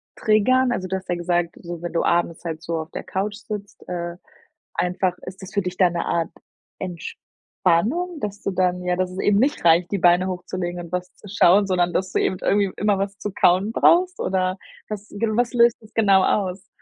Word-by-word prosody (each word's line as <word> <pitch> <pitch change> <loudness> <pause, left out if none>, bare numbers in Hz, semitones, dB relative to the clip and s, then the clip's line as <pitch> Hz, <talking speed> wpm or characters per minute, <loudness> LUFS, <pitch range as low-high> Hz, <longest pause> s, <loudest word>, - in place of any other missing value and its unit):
triggern? 245 +4 +3
Also, 185 -6 -2
du 190 - -2
hast 190 -1 -7
ja 175 - +1
gesagt, 175 -1 -1
so 175 -1 -7
wenn 175 - -4
du 165 - +1
abends 170 0 0
halt 160 -1 -4
so 165 -1 -3
auf 160 - -7
der - - -6
Couch 205 +2 -3
sitzt, 205 -1 -8
äh, 175 -1 -4 0.6
einfach, 180 0 0
ist 190 +1 -9
das 190 - -9
für 200 - +1
dich 180 0 -4
da 180 -2 +4
‘ne 170 0 -2
Art 165 -1 0 0.5
Entspannung, 190 - -2
dass 205 0 -5
du - - -1
dann 180 -1 0
ja, 180 0 0
dass 185 0 -1
es 185 - -8
eben 205 -1 +3
nicht 275 +1 +1
reicht, 170 +1 +4
die 200 - +1
Beine 175 +1 +4
hochzulegen 180 -1 -4
und 170 0 -9
was 180 0 -3
zu 205 - -14
schauen, 200 0 +4
sondern 180 -2 +1
dass 190 0 -1
du - - +1
eben 185 - -1
irgendwie 200 -2 +2
immer 205 -2 +1
was 200 0 -3
zu 205 - -4
kauen 190 +5 +3
brauchst 360 +8 +4
oder 185 0 0 0.3
was 210 0 -6
gen 215 +1 0
was 245 0 +1
löst 235 -1 +5
das 220 -1 -19
genau 200 -4 +4
aus? 190 -2 -1
185 Hz, 215 wpm, -22 LUFS, 175-205 Hz, 0.6 s, löst